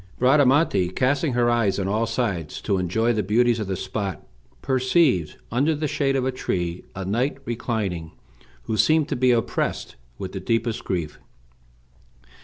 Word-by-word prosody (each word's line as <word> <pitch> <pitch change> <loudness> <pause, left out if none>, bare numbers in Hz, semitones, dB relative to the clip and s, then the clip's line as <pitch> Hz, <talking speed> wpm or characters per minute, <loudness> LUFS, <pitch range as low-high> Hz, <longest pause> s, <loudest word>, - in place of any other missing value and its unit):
Bradamante, 130 - +4
casting 135 - +1
her 120 0 +2
eyes 115 -4 +2
on 95 -1 -1
all 110 +3 0
sides 105 -9 -2
to 100 -3 0
enjoy 110 +7 +1
the 110 - 0
beauties 115 +4 +2
of 105 - -3
the 95 - -2
spot, 95 -2 -4 0.4
perceived, 130 - +2
under 140 +7 +2
the 150 +1 -2
shade 135 -1 0
of 130 -1 0
a 130 - +1
tree, 90 -8 -3
a 95 0 -4
knight 120 +9 0
reclining, 105 -9 -3 0.5
who 110 - -2
seemed 155 +8 +3
to - - -1
be 130 +1 +2
oppressed 115 -3 -1 0.2
with - - -6
the - - -5
deepest 115 0 -1
grief. 85 -5 -3
115 Hz, 160 wpm, -24 LUFS, 95-130 Hz, 0.5 s, Bradamante